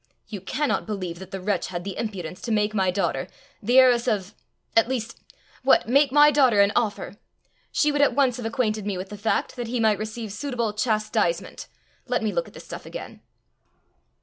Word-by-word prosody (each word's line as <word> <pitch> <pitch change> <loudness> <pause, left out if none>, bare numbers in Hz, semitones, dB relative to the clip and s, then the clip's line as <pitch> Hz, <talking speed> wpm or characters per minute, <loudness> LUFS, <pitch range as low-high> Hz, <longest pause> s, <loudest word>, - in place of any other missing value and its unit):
"You 205 -4 -6
cannot 280 +9 -1
believe 185 -5 -4
that 190 -1 -10
the 195 - -5
wretch 200 +2 -1
had 175 -1 -5
the 195 -1 -5
impudence 185 -6 -5
to 235 - -4
make 210 0 +1
my 190 -3 +2
daughter 195 +2 -1 0.3
the 240 +4 +2
heiress 250 -2 +6
of 200 -1 -1 0.4
at 225 - +5
least 230 -3 -4 0.4
What! 265 -2 +4
make 275 +3 +4
my 295 +1 +7
daughter 260 -7 +4
an 200 0 +5
offer! 210 -3 -1 0.5
She 300 - +2
would 290 0 +1
at 285 - +3
once 265 -4 +2
have 245 - -6
acquainted 220 -4 -1
me 200 -3 -2
with 185 +1 -6
the 210 - -7
fact, 215 +2 -1
that 240 -1 -4
he 245 +1 -2
might 220 -2 +3
receive 215 -1 -5
suitable 235 -2 -2
chastisement. 215 - -1 0.4
Let - - 0
me - - 0
look - - -1
at - - -16
the - - -9
stuff - - -9
again." - - -8
220 Hz, 200 wpm, -24 LUFS, 200-255 Hz, 0.5 s, my